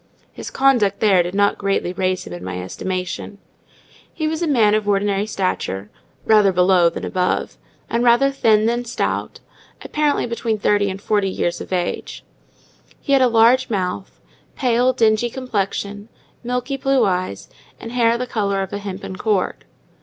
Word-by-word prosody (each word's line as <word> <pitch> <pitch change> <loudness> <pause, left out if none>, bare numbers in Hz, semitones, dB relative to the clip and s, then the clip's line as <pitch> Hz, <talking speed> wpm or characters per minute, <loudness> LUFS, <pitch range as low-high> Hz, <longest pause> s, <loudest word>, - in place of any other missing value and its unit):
His - - -8
conduct 240 -8 +2
there 195 -4 +4
did 175 +2 -4
not 200 0 +2
greatly 195 -3 -1
raise 185 -1 -1
him 90 - -8
in 90 0 -8
my 90 0 -5
estimation. 185 - -5 0.7
He 315 - -3
was 315 +1 -2
a 340 - 0
man 225 -8 +3
of 215 -1 0
ordinary 200 0 +1
stature—rather 190 - 0
below 180 -1 +4
than 165 - -6
above—and 185 +5 -3
rather 245 +3 +4
thin 220 -5 +3
than 240 +1 0
stout, 240 - -3 0.4
apparently 300 -1 0
between 230 -2 -2
thirty 205 -1 +1
and 190 +1 -5
forty 205 -1 0
years 175 -2 -2
of - - -9
age: 180 -1 -3 0.8
he 280 - -1
had 270 - +5
a 255 - +5
large 240 +3 +4
mouth, 190 -2 -3 0.4
pale, 250 -1 +2
dingy 225 -1 +2
complexion, 205 -4 -3 0.3
milky 250 +2 -2
blue 270 0 +2
eyes, 180 - -2 0.3
and 230 - -8
hair 235 -1 +2
the 250 - -3
colour 200 -5 -1
of 190 - -8
a 200 - -3
hempen 195 -1 -7
cord. 205 -3 -1
205 Hz, 155 wpm, -20 LUFS, 190-240 Hz, 0.8 s, had